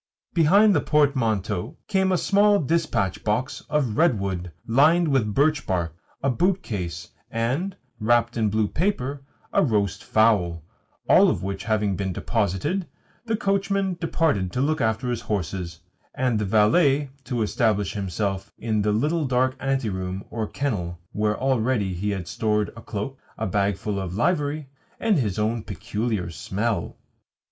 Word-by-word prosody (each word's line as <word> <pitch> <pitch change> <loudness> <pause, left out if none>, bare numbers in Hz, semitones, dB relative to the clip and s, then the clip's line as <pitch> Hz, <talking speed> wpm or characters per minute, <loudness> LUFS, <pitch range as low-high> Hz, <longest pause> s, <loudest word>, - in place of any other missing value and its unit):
Behind 195 +6 +5
the 150 - +2
portmanteau 115 - +1
came 190 -1 +2
a 185 - +3
small 205 +3 +4
dispatch 155 - 0
box 110 +5 -1
of 135 -8 0
redwood, 100 - +1
lined 155 +8 +4
with 120 -8 +1
birch 145 0 +2
bark, 85 -4 -1 0.3
a 135 - +3
boot 185 +7 +1
case, 90 -5 -5 0.2
and 135 - -1 0.2
(wrapped 120 +2 +2
in 110 -2 +1
blue 110 0 +1
paper) 145 - -1 0.3
a - - +4
roast 100 -6 0
fowl; 95 -7 +2 0.4
all - - +6
of - - -1
which 95 +1 -4
having 105 -3 +1
been 95 0 -2
deposited, 115 - -1 0.4
the 225 -1 +1
coachman 195 -1 0
departed 150 - +1
to - - -1
look 155 +4 +1
after 110 +2 0
his 120 - -2
horses, 90 -4 -3 0.3
and 125 -5 +1
the 105 - -1
valet 135 - +3
to 120 -4 -1
establish 105 -1 +1
himself 95 0 -3
in 110 -2 0
the 105 +1 +1
little 150 +9 +1
dark 130 +1 +1
anteroom 100 -9 -2
or 110 -2 -2
kennel 95 -13 -2
where 105 0 0
already 125 -6 +1
he 95 +4 -2
had 95 -4 -3
stored 105 +1 0
a 115 - -12
cloak, 110 +6 -5 0.2
a 110 - -2
bagful 100 0 -1
of 95 -1 -4
livery, 150 - 0 0.3
and 215 -7 +2
his 105 -6 -1
own 110 +2 0
peculiar 105 -3 -3
smell. 105 +6 -2
115 Hz, 150 wpm, -24 LUFS, 100-145 Hz, 0.4 s, all